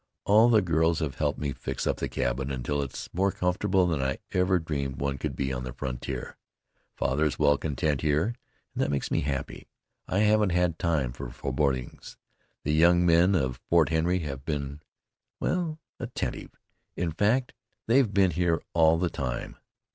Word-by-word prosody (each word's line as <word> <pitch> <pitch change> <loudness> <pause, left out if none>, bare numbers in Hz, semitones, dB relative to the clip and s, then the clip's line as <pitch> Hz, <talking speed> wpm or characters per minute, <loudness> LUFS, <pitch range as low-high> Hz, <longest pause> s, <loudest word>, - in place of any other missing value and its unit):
All 110 +4 +6
the 110 -4 +5
girls 80 -1 +2
have 75 -5 -3
helped - - 0
me 70 -2 -2
fix - - -4
up - - 0
the - - -3
cabin 65 +3 -1
until 70 +2 -2
it's 70 -2 -6
more 95 +3 +2
comfortable 90 +1 +1
than 80 -6 0
I 65 0 -1
ever 90 0 +2
dreamed 70 -5 -3
one 70 0 -2
could 70 -2 -3
be 65 0 -2
on 65 -1 -4
the 65 -1 -6
frontier. 65 0 -5 0.6
Father 70 +4 0
is 75 - -1
well 75 - +4
content 75 0 -1
here, 75 +9 +1 0.4
and - - -13
that - - +1
makes 70 -2 -2
me - - +2
happy. 70 0 -4 0.4
I 95 - +1
haven't 105 -3 +3
had 90 -2 +1
time 80 -8 0
for - - -7
forebodings. 65 0 -2 0.5
The 75 - 0
young 85 +2 +5
men 85 +3 +5
of 65 -7 -1
Fort 85 -3 +4
Henry 85 +3 +1
have 70 -4 -5
been 70 -1 -4 0.6
well, 170 -4 -1 0.2
attentive; - - -4 0.5
in 85 -2 -1
fact, 110 +10 +1 0.3
they've 120 -1 +3
been 95 -3 +3
here 85 0 +1
all 80 -1 +5
the 90 +1 0
time." 65 -3 -4
80 Hz, 175 wpm, -27 LUFS, 70-90 Hz, 0.6 s, All